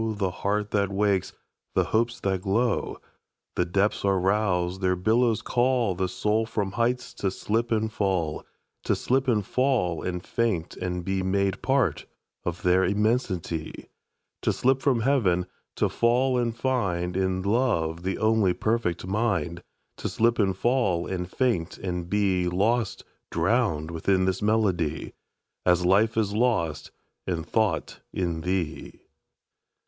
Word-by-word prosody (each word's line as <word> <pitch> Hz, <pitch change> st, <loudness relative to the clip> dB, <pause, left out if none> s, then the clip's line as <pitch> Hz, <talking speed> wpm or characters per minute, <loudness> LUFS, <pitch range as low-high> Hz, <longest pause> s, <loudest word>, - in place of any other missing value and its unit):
The 100 Hz, -3 st, -1 dB
heart 105 Hz, +3 st, -2 dB
that 100 Hz, -2 st, +1 dB
wakes, 100 Hz, -1 st, +1 dB, 0.4 s
the -, -, +4 dB
hopes 115 Hz, +2 st, 0 dB
that 95 Hz, -2 st, 0 dB
glow! 110 Hz, +4 st, 0 dB, 0.6 s
The 90 Hz, -, +1 dB
depths 100 Hz, +4 st, 0 dB
are 100 Hz, -1 st, +2 dB
roused: 95 Hz, -2 st, +1 dB
their 90 Hz, -1 st, +2 dB
billows 110 Hz, +4 st, +2 dB
callThe 120 Hz, -7 st, +1 dB
soul 110 Hz, +4 st, 0 dB
from 105 Hz, -4 st, -2 dB
heights 120 Hz, +4 st, -1 dB
to 100 Hz, -, -1 dB
slip 115 Hz, +5 st, -1 dB
and 110 Hz, 0 st, 0 dB
fall; 90 Hz, -6 st, -1 dB, 0.4 s
To -, -, +2 dB
slip 130 Hz, +1 st, 0 dB
and 105 Hz, -5 st, +2 dB
fall 125 Hz, -10 st, +1 dB
and 90 Hz, -1 st, -4 dB
faint 100 Hz, -8 st, -1 dB
and 90 Hz, -1 st, -4 dB
beMade 95 Hz, 0 st, 0 dB
part 130 Hz, -, +1 dB, 0.4 s
of 85 Hz, 0 st, -4 dB
their 90 Hz, +1 st, +4 dB
immensity; 100 Hz, -5 st, -1 dB, 0.5 s
To -, -, +2 dB
slip 130 Hz, +1 st, +1 dB
from 130 Hz, -5 st, +2 dB
Heaven; 105 Hz, -9 st, +2 dB, 0.3 s
to -, -, +2 dB
fall 125 Hz, +3 st, +2 dB
and 120 Hz, -2 st, 0 dB
findIn 95 Hz, -6 st, -1 dB
love 100 Hz, -8 st, +1 dB
the 95 Hz, +2 st, -2 dB
only 110 Hz, -4 st, +3 dB
perfect 110 Hz, -5 st, -1 dB
mind; 95 Hz, -5 st, -1 dB, 0.4 s
To -, -, -3 dB
slip 115 Hz, +1 st, +2 dB
and 95 Hz, -3 st, +2 dB
fall 105 Hz, -9 st, +1 dB
and 90 Hz, -2 st, -4 dB
faint 95 Hz, -9 st, 0 dB
and 90 Hz, -2 st, -4 dB
beLost, 100 Hz, +3 st, +1 dB, 0.3 s
drowned 85 Hz, -3 st, +1 dB
within 95 Hz, +3 st, +1 dB
this 95 Hz, -1 st, -1 dB
melody, 95 Hz, -8 st, 0 dB, 0.5 s
As 90 Hz, 0 st, +3 dB
life 105 Hz, +5 st, +3 dB
is 105 Hz, -2 st, +1 dB
lost 105 Hz, -, 0 dB, 0.4 s
and 85 Hz, -4 st, -2 dB
thought 100 Hz, -, 0 dB
in 85 Hz, -3 st, -2 dB
thee. 90 Hz, -3 st, -3 dB
100 Hz, 135 wpm, -26 LUFS, 90-115 Hz, 0.6 s, the